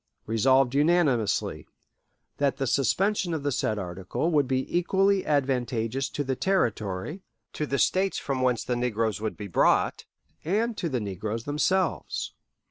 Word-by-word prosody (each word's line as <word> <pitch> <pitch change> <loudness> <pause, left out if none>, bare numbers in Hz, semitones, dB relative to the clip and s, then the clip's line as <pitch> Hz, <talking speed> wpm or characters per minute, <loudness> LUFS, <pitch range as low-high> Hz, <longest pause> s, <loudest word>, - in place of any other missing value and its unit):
"Resolved 125 +4 +3
unanimously, 145 - +1 0.7
That 140 -1 +1
the 135 - -1
suspension 175 - +1
of 150 - -4
the 145 - 0
said 110 -4 0
article 95 - -3
would 145 -4 +3
be 130 0 0
equally 195 +2 +2
advantageous 130 -3 0
to 145 - -3
the 130 -1 -1
Territory, 120 - -1 0.3
to 150 - -3
the 140 - -1
States 190 +8 +2
from 135 -2 -2
whence 125 -2 +1
the 125 - -1
negroes 115 -3 -1
would 110 - -3
be 105 - -6
brought, 90 - +2 0.4
and 220 +7 0
to 170 - -2
the 130 -4 -1
negroes 105 +2 -4
themselves.... 165 +6 -1
135 Hz, 145 wpm, -27 LUFS, 115-165 Hz, 0.7 s, Resolved